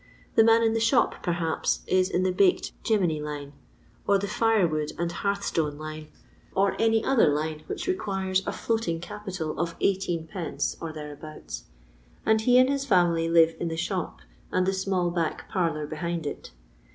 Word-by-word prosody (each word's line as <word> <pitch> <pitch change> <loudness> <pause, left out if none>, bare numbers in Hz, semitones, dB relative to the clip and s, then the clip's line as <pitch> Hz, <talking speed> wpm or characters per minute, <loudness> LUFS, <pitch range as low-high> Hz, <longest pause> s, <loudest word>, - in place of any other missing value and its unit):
" - - -30
The 225 - +7
man 225 +1 +5
in 225 -1 +3
the 225 - +1
shop, 230 +3 +2
perhaps, 170 -2 -1
is 185 0 +2
in 185 -1 0
the 185 - +2
baked 185 0 +2
'jemmy' 180 -9 +1
line, 145 -1 -6 0.5
or 200 - +5
the 200 - -2
fire 220 -2 +3
wood 155 -1 -2
and 170 0 -1
hearth 200 +3 -2
stone 150 -3 -1
line, 155 0 -7 0.5
or 195 0 +2
any 225 -1 +3
other 270 -9 +4
line 155 +1 -2
which - - -4
requires 190 - 0
a - - 0
floating 220 -8 -1
capital 180 -3 -5
of 170 0 -1
eighteen 185 -4 0
pence 165 0 -3
or 165 - -4
thereabouts: 150 0 -8 0.6
and 220 0 +3
he 245 +2 +5
and 255 0 +6
his 275 0 0
family 175 -8 +3
live 165 -1 +5
in 170 - -2
the 165 0 -3
shop, - - -3 0.3
and 185 0 +2
the 190 - +1
small 190 -2 0
back 170 -3 -2
parlour 165 -5 0
behind 165 +2 -3
it. 145 - -5
175 Hz, 180 wpm, -26 LUFS, 160-200 Hz, 0.6 s, The